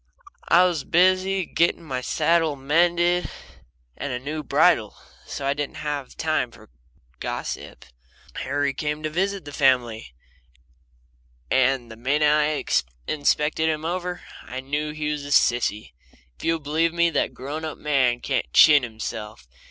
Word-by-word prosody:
I 175 +2 +6
was 175 -6 0
busy 185 +1 +2
getting 170 +1 +1
my 130 -5 -4
saddle 160 +2 +1
mended 175 +5 +2 0.7
and 145 - -5
a 125 - -2
new 150 +5 -5
bridle, 145 - +2 0.3
so 140 - -5
I 140 - +2
didn't 145 0 -4
have 145 -3 -5
time 155 -6 0
for 115 - -18 0.5
gossip. - - -5 0.5
Harry 140 -1 -1
came 150 +2 -3
to 155 - -2
visit 195 +2 -1
the 145 - -8
family, 120 - +1 1.4
and 130 -2 +2
the 110 - -10
minute 145 +5 +1
I 150 0 +2 0.5
inspected 155 +1 +1
him 155 0 -2
over 180 +1 -3 0.2
I 130 - -7
knew 145 +3 -3
he 150 0 -3
was 150 -1 -4
a 145 - -7
sissy. 120 - +2 0.4
If - - -14
you'll 165 0 +2
believe 160 +2 0
me, 170 0 +2
that 145 - -1
grown 145 +5 -6
up 155 -1 -5
man 130 -5 +1
can't 135 - -2
chin 150 -2 +8
himself. 110 - -7
150 Hz, 145 wpm, -24 LUFS, 130-165 Hz, 1.4 s, chin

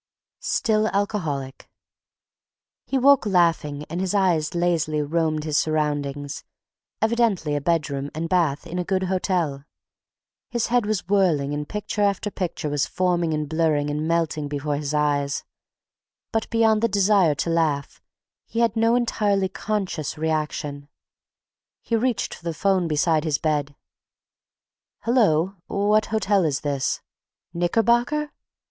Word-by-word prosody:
STILL 220 - +1
ALCOHOLIC 160 -10 -2 1.2
He 270 - 0
awoke 270 -3 +5
laughing 165 -6 +1
and 170 +3 -4
his 190 +1 -1
eyes 175 -4 +1
lazily 165 -3 +1
roamed 155 0 0
his 155 -1 +1
surroundings, 145 -2 -2 0.6
evidently 220 -9 +1
a 145 - -1
bedroom 145 -3 -1
and 165 +1 -2
bath 165 -5 +1
in 180 - -4
a - - 0
good 190 +1 0
hotel. 180 -6 -1 0.9
His 235 -2 -1
head 240 -4 +3
was 215 -5 -1
whirring 170 -8 +2
and 145 0 -4
picture 210 0 -3
after 205 +1 +1
picture 175 -5 -3
was 145 -1 0
forming 175 -3 0
and 150 -1 -1
blurring 155 -2 +1
and 150 +2 -2
melting 165 -3 0
before 145 0 -2
his 145 0 -3
eyes, 145 -2 0 0.9
but 225 -1 -1
beyond 220 -2 +3
the 230 - +3
desire 195 -6 +3
to 165 - -1
laugh 155 -4 0 0.5
he 230 - -1
had 230 -2 +2
no 225 +1 +3
entirely 205 -5 +1
conscious 190 -7 -3
reaction. 150 -2 -2 1.0
He 230 - 0
reached 235 0 0
for - - -12
the 170 -1 -3
'phone 190 0 +1
beside 155 0 +2
his 155 -3 +1
bed. 145 -2 -1 1.3
"Hello—what 200 -1 +1
hotel 205 -3 +1
is 145 -4 0
this—? 140 -3 -1 0.5
"Knickerbocker? 240 +11 +1
170 Hz, 130 wpm, -23 LUFS, 150-205 Hz, 1.3 s, awoke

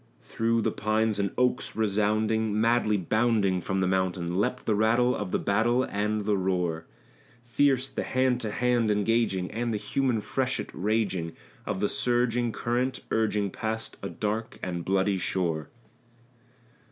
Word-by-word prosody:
Through 115 0 0
the - - +1
pines 110 0 0
and 100 -1 +1
oaks 125 -3 0
resounding, 110 0 +1
madly 115 -2 +3
bounding 100 -1 +1
from 95 +2 -1
the 95 - +2
mountain, 90 -2 0
Leapt 125 +6 -1
the 110 - +2
rattle 115 +4 +3
of 105 -3 -4
the - - +1
battle 115 +5 +2
and 105 -1 -1
the 105 -1 +2
roar; 90 -4 -1 0.6
Fierce 130 +1 +2
the - - -4
hand 130 -1 +1
to 110 - -3
hand 120 -1 +1
engaging, 105 -3 +1
and 120 +2 -2
the 110 - 0
human 125 +2 0
freshet 130 +4 -2
raging 100 -5 -1 0.3
Of 100 -2 -2
the 105 - +3
surging 120 0 +1
current 125 +4 -1
urging 105 -3 +1
past 110 +2 -4
a - - -4
dark 110 +1 -3
and 85 -2 -3
bloody 95 +1 +1
shore. 85 -5 -1
110 Hz, 150 wpm, -27 LUFS, 95-120 Hz, 0.6 s, madly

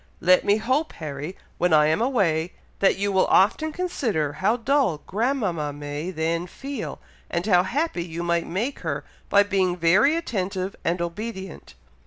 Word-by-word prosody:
Let 185 +1 +4
me 205 +1 +3
hope, 260 +8 0
Harry, 150 +2 -6 0.2
when 180 -2 +2
I 150 -1 +6
am 160 +7 +2
away, 180 -10 +1 0.3
that 195 - +3
you 200 +1 0
will 190 -1 +3
often 310 +11 +3
consider 235 - -1
how 210 +9 +1
dull 250 - +1
grandmama 200 - -1
may 145 +3 -5
then 165 0 -1
feel, 275 +8 -6 0.3
and 170 +1 -2
how 180 -4 +5
happy 235 - -1
you 170 0 -5
might 170 -1 0
make 220 +11 -2
her - - -3 0.3
by 200 0 +6
being 190 -3 0
very 190 - +4
attentive 195 - -3
and 170 +1 0
obedient." 190 +1 -6
185 Hz, 160 wpm, -24 LUFS, 170-230 Hz, 0.3 s, I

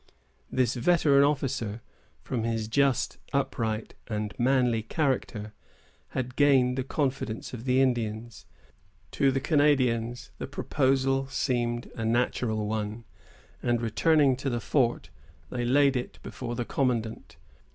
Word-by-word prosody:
This 125 -3 +1
veteran 140 +1 +4
officer, 130 -6 -1 0.4
from 120 -3 -2
his 115 -1 -1
just, 135 +3 +1
upright, 115 -5 -1
and 105 -1 -3
manly 125 -2 +2
character, 115 -5 -2 0.6
had 125 -1 -3
gained 135 -3 +4
the 130 - -1
confidence 130 -5 -2
of 120 0 -7
the 130 0 +3
Indians. 115 -2 -2 0.6
To 140 - +2
the 135 - 0
Canadians 130 -5 +1
the - - -4
proposal 135 0 +1
seemed 120 -3 -1
a 115 - -4
natural 115 -1 0
one, 110 +1 -3 0.6
and 120 -1 +1
returning 135 +5 +3
to 135 +1 -2
the 120 -2 -1
fort, 120 -2 0 0.4
they 120 -1 -2
laid 140 +2 +4
it 125 - -4
before 120 -2 -5
the 120 - -2
commandant. 115 -5 -2
125 Hz, 125 wpm, -28 LUFS, 115-135 Hz, 0.6 s, veteran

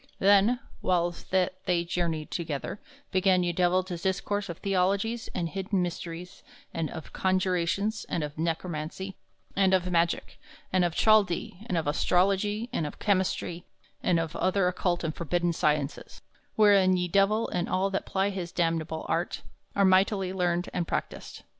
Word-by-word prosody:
Then, 205 +5 +4 0.2
whiles 175 -1 0
that 185 0 0
they 175 -1 +2
journeyed 170 -3 -2
together, 160 +3 -4 0.3
began 185 -1 +3
ye 175 - +1
Divell 180 +1 +2
to 180 -2 -5
discourse 195 +2 -1
of 170 - -5
theologies 200 +4 0
and 175 -2 -1
hidden 190 +1 -1
mysteries, 175 0 -6 0.3
and 165 -2 -2
of 160 -2 -9
conjurations, 190 +3 0
and 165 - -1
of 150 0 -5
negromancy 165 +3 -3 0.4
and 190 -1 +4
of 185 - +1
magick, 170 0 0 0.3
and 185 -1 +4
of 175 -2 0
Chaldee, 205 -5 +3
and 180 - 0
of 165 - 0
astrology, 195 +8 +1
and 155 - 0
of - - -9
chymistry, 185 -3 0 0.4
and 175 -2 +2
of 165 0 -3
other 185 0 +2
occult 180 -1 0
and 160 -1 -1
forbidden 175 +1 0
sciences, 150 -3 -1 0.3
wherein 200 -3 +5
ye 180 0 0
Divell 200 +5 +2
and 175 - -2
all 190 +1 +1
that 195 - -2
ply 195 +1 +1
his 180 -3 -5
damnable 165 -2 -1
arts 170 +2 -1 0.3
are 200 - +4
mightily 190 0 +3
learned 175 -1 0
and 175 -2 -1
practised. - - -4
180 Hz, 155 wpm, -28 LUFS, 170-195 Hz, 0.4 s, wherein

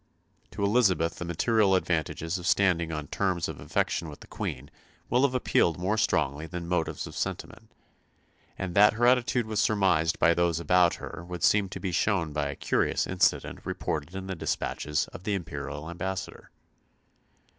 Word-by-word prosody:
To 100 - -5
Elizabeth 100 -7 +2
the 90 - -5
material 95 +4 +2
advantages 85 0 -1
of 90 - -5
standing 85 -5 +2
on 75 -2 -4
terms 95 -4 0
of - - -7
affection 80 - -1
with 75 - -11
the - - -11
Queen 65 +3 -5 0.4
will 125 - +4
have 135 -2 +2
appealed 85 -9 +2
more 95 +5 0
strongly 75 -7 0
than 85 0 -6
motives 85 -2 -1
of - - -10
sentiment; - - -5 0.9
and 95 -2 -4
that 105 +2 +6
her 120 +2 +1
attitude 125 -1 +3
was 110 -2 -2
surmised 95 -6 +2
by 85 - +4
those 85 -1 +1
about 90 0 +3
her 80 - -8
would 90 -2 -5
seem 100 -2 +3
to 95 - -6
be 95 - -3
shown 85 -4 0
by 75 -1 -1
a 70 - -4
curious - - 0
incident - - 0
reported 75 +4 -4
in 95 0 -5
the 95 - -4
despatches 75 -3 -2
of 90 - -11
the 105 0 0
imperial 75 -3 -5
ambassador. 90 +3 -5
90 Hz, 170 wpm, -28 LUFS, 80-100 Hz, 0.9 s, that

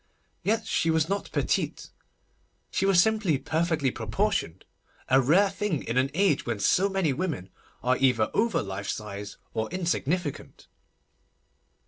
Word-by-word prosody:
Yet 220 +2 0
she 165 - 0
was 160 -1 +2
not 200 +2 -3
petite. - - -1 0.8
She 195 - +1
was 195 -3 +5
simply 215 -6 +3
perfectly 160 -2 0
proportioned—a 125 - -1
rare 185 +10 +4
thing 195 -7 -2
in 115 - -3
an 130 +2 +2
age 190 -6 +2
when 120 -4 -3
so 185 - +3
many 190 -7 +1
women 150 - -3 0.3
are 125 +1 +3
either 125 -5 +2
over 225 0 +1
life 100 0 -5
size 100 -1 -5 0.2
or 110 0 -2
insignificant. 175 -3 -2
155 Hz, 130 wpm, -27 LUFS, 120-195 Hz, 0.8 s, was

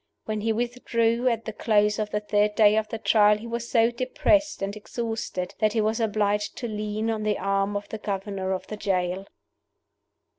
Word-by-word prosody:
When 215 -1 -2
he 225 +1 +1
withdrew 235 0 0
at 230 -2 0
the 220 - -4
close 210 -1 +2
of 210 -1 -1
the 210 - -2
third 210 0 +1
day 210 -1 +6
of 215 0 +1
the 225 - -4
Trial 210 -1 +4
he 215 - -10
was 235 0 -4
so 230 -1 +4
depressed 295 +2 +1
and 200 +1 -3
exhausted 220 -4 -4
that 215 -1 +2
he 225 - +2
was 220 +2 0
obliged 210 -2 0
to 240 - -3
lean 215 +1 -2
on 220 -1 -2
the 210 -1 0
arm 195 +1 0
of 205 - -7
the 220 - -5
governor 195 -2 -3
of 185 - -2
the 215 - -7
jail. 190 -1 -1
215 Hz, 195 wpm, -26 LUFS, 205-230 Hz, -, day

